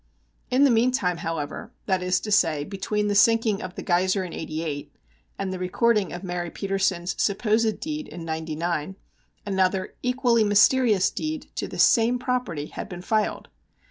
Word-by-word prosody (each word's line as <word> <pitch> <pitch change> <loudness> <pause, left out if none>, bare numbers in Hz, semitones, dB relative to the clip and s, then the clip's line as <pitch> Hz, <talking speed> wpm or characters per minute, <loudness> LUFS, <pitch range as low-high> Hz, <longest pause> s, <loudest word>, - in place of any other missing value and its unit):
In 260 +3 +3
the 280 - +6
meantime, 230 -6 +2
however, 160 -3 -4
that 190 -2 +1
is 180 0 +1
to 210 - -5
say, 160 -8 +3
between 210 +4 -2
the 205 - +1
sinking 220 0 +3
of 185 -1 -7
the - - -6
Geiser 185 +2 +1
in 180 - -7
'88 155 -2 -4 0.5
and 195 -1 -3
the 185 - -5
recording 205 +2 +1
of 175 +2 -7
Mary 175 -2 -3
Petersen's 195 -2 -1
supposed 220 +1 +1
deed 305 -1 -4
in 170 -1 -8
'99, 160 +2 -3 0.5
another 190 -1 0
equally 250 -2 +2
mysterious 210 0 +4
deed 310 0 -4
to - - -3
the - - -8
same 235 +1 +4
property 245 - -2
had - - -7
been 180 -2 -8
filed. 215 +1 -1
195 Hz, 160 wpm, -25 LUFS, 175-225 Hz, 0.5 s, the